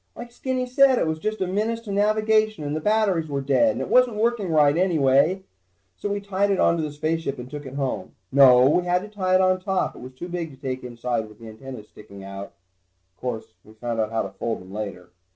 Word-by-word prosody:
Like 240 0 -9
Skinny 255 +1 -2
said, 260 +1 +4
it - - +1
was 160 0 -2
just 215 +5 -3
a - - +2
menace 215 +5 -1
to 220 -3 -7
navigation, 215 -1 +2
and 145 +1 -3
the - - -1
batteries 205 -5 +1
were 140 -1 -1
dead, 145 - +3
and - - -4
it - - -3
wasn't 250 -3 +4
working 220 -3 0
right 150 -2 +4
anyway. 165 0 +3 0.5
So 205 - -4
we 205 0 -1
tied 200 0 0
it 195 - +1
onto 170 -1 +3
the 155 -1 -3
spaceship 155 0 -2
and 125 - -8
took 145 -1 -7
it 130 - -9
home. 135 -2 -3 0.2
No, 130 -2 +7
we 175 +5 +2
had 180 +1 +1
to - - -7
tie 190 -3 0
it 185 - +5
on 185 0 +3
top, 190 -1 -1
it - - -11
was 130 +1 -10
too 175 - -7
big 175 -2 -4
to 135 - -14
take 130 -1 -5
inside 120 -2 -3
with 105 - -16
the 115 0 -12
antennas 110 -1 -10
sticking 100 -2 -13
out. 100 0 -8 0.6
Course, 115 0 -5
we 110 - -17
found 115 0 -4
out 110 -1 0
how 115 0 -1
to 100 - -5
fold 110 +4 -4
them 95 +1 -13
later. 100 -4 -6
160 Hz, 240 wpm, -24 LUFS, 125-205 Hz, 0.6 s, No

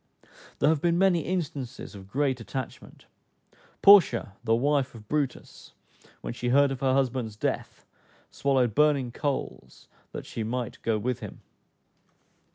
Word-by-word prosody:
There 145 - +3
have 155 -3 +1
been 170 -1 +2
many 190 -2 +4
instances 145 -9 -4
of 95 -1 -12
great 135 +1 0
attachment. 130 +2 -7 0.8
Porcia, 180 - +6
the 115 -1 +2
wife 140 +1 +1
of 105 -2 -13
Brutus, 145 -2 -4 0.5
when - - -5
she 120 0 -3
heard 140 +2 +4
of 135 - -4
her 130 -1 +2
husband's 125 -5 -1
death - - -4 0.5
swallowed 130 -5 +1
burning 140 -2 +2
coals 140 +2 -4 0.2
that - - -7
she - - -6
might 120 +2 -4
go 115 -1 0
with 125 +2 -2
him. - - -9
130 Hz, 140 wpm, -27 LUFS, 120-145 Hz, 0.8 s, Porcia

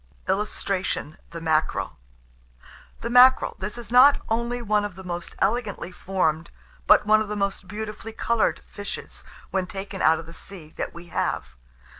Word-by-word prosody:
[Illustration: 190 -4 -2
THE 165 - -8
MACKEREL.] 160 -1 0 1.1
THE 235 - -3
MACKEREL. 255 +1 +6
This 210 +5 -5
is 230 -2 -9
not 265 +4 +7
only 235 +2 -1
one 210 -3 +1
of 205 -3 -5
the 190 - -10
most 175 -1 -6
elegantly 205 -3 -1
formed, 170 -4 -1 0.4
but - - +6
one 215 +1 +5
of 215 - -2
the 210 - -3
most 200 -2 -2
beautifully 215 +2 -6
coloured 230 0 0
fishes, 205 0 -7 0.3
when 190 -1 0
taken 195 +1 -6
out 160 +1 +5
of 165 - -8
the 165 - -12
sea, 165 -3 -10
that - - -4
we 170 0 -11
have. 65 - -2
200 Hz, 160 wpm, -25 LUFS, 175-220 Hz, 1.1 s, not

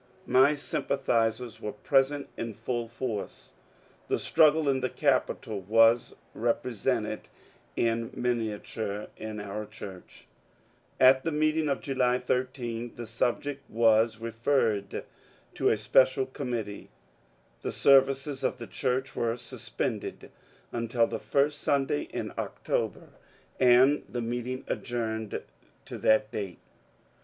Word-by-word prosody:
My 135 +4 +5
sympathizers 120 -5 -1
were 105 - -4
present 135 +5 +1
in 115 -2 -5
full 115 +1 -3
force. 115 -3 -5 0.6
The - - +1
struggle 155 -1 +4
in 135 -1 +2
the 130 0 -1
Capitol 110 -3 0
was 115 +4 +4 0.2
represented 115 -1 -1 0.5
in 115 0 0
minia 115 -4 -1
ture 105 -2 -4
in 110 -1 -6
our 105 +1 -5
church. 100 -4 -11 0.7
At 130 0 +6
the 165 - -1
meeting 155 0 +1
of 140 - -1
July 125 -2 +1
13 125 -2 -2
the 120 - -6
subject 125 +5 -2
was 110 0 +3
referred 115 -2 0 0.5
to - - +2
a - - +2
special 130 +5 +4
committee. 120 -6 -5 0.7
The - - -3
services 135 0 +3
of 130 - 0
the 120 - -7
church 125 +5 -2
were 115 0 0
suspended - - -5 0.4
until 115 0 +1
the - - -4
first 145 +1 +1
Sunday 135 - +1
in - - -4
October, - - -2 0.5
and 130 +3 +5
the 120 -1 -3
meeting 125 +2 -3
adjourned 110 -3 -3 0.4
to - - -7
that 110 0 +3
date. 100 -6 -4
120 Hz, 120 wpm, -28 LUFS, 110-135 Hz, 0.7 s, At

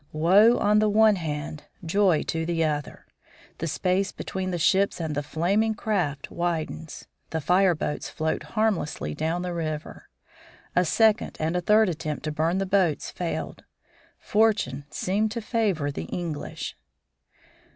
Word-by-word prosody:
Woe 195 +9 +5
on 210 +1 +3
the 215 0 +3
one 215 0 +5
hand, 155 -2 -5 0.2
joy 185 -1 +3
on 165 0 -1
the 165 -1 +1
other! 150 -1 -3 0.5
the 165 - -2
space 185 +5 0
between 190 -1 -4
the 180 - -2
ships 190 +4 +2
and 160 -2 -2
the 145 - -1
flaming 195 +9 0
craft 180 -11 -2
widens 165 -2 -3 0.2
the 160 - -2
fireboats 175 -2 +1
float 160 -1 -2
harmlessly 200 - -1
down 165 - -2
the 180 -1 -3
river. 155 -2 -5 0.7
A 180 - +4
second 220 +5 +2
and 160 +2 -1
a 180 - +1
third 215 +4 +4
attempt 155 -3 -3
to 155 - -2
burn 160 +4 0
the 195 - 0
boats 185 -5 +1
failed. 175 -2 -4 0.5
Fortune 205 -11 +1
seemed 205 +7 0
to 235 - -3
favor 210 - 0
the 80 - -5
English. 165 - -5
175 Hz, 145 wpm, -26 LUFS, 155-200 Hz, 0.7 s, Woe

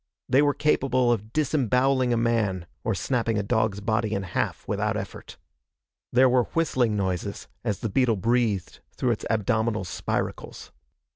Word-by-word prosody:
They 135 - +4
were 145 -1 +2
capable 130 -4 +2
of 110 -1 -2
disemboweling 130 -3 +2
a 120 - +2
man 110 -6 0 0.2
or 115 -4 0
snapping 115 0 0
a 105 - 0
dog's 110 -1 0
body 110 0 0
in 100 - -2
half 90 - -3
without - - -1
effort. - - -8 0.7
There 130 +2 +5
were 125 -1 +3
whistling 130 -9 +1
noises 95 -3 -3 0.2
as 105 - -2
the 115 - -2
beetle 120 +1 +2
breathed 110 -2 0 0.2
through 125 - +1
its 115 - -3
abdominal 110 0 0
spiracles. 90 - -4
115 Hz, 150 wpm, -26 LUFS, 105-125 Hz, 0.7 s, There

